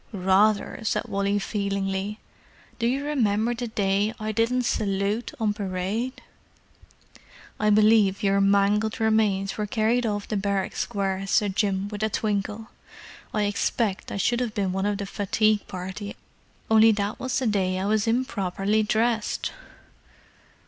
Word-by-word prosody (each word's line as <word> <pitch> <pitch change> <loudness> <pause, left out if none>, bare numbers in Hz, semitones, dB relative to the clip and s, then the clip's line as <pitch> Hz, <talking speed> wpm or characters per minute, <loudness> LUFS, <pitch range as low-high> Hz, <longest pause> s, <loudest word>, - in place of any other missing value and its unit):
"Rather!" 200 +2 +2
said 215 -1 0
Wally 200 +1 0
feelingly. 200 0 -2 0.6
"Do 230 - +1
you 270 +4 -1
remember 235 -5 +1
the 240 0 -4
day 205 0 0
I 215 0 -2
didn't 230 +3 +1
salute 205 +1 -1
on 215 -2 +1
parade?" 205 +5 -3 1.4
"I 210 - +2
believe 210 -2 +4
your 200 0 +3
mangled 200 +2 +2
remains 215 -3 +1
were 210 - -1
carried 230 +2 +1
off 205 -1 -2
the 215 - -1
barrack 195 -1 -1
square," 195 -1 -2
said 195 -1 +1
Jim, 200 -2 0
with 210 0 -6
a 220 - +1
twinkle. 210 +1 -2 0.6
"I 210 - 0
expect 205 0 -1
I - - -3
should 240 +5 +1
have 240 -3 -2
been 195 -3 0
one 190 +2 -1
of 205 -1 0
the 200 - -4
fatigue 210 +1 +1
part, 185 +2 -6 0.7
only 220 0 +7
that 205 0 -2
was 260 -1 -1
the 260 - -1
day 190 -4 +1
I 190 - -2
was 215 +1 +1
improperly 215 -4 0
dressed!" 220 +1 0
210 Hz, 145 wpm, -25 LUFS, 195-220 Hz, 1.4 s, only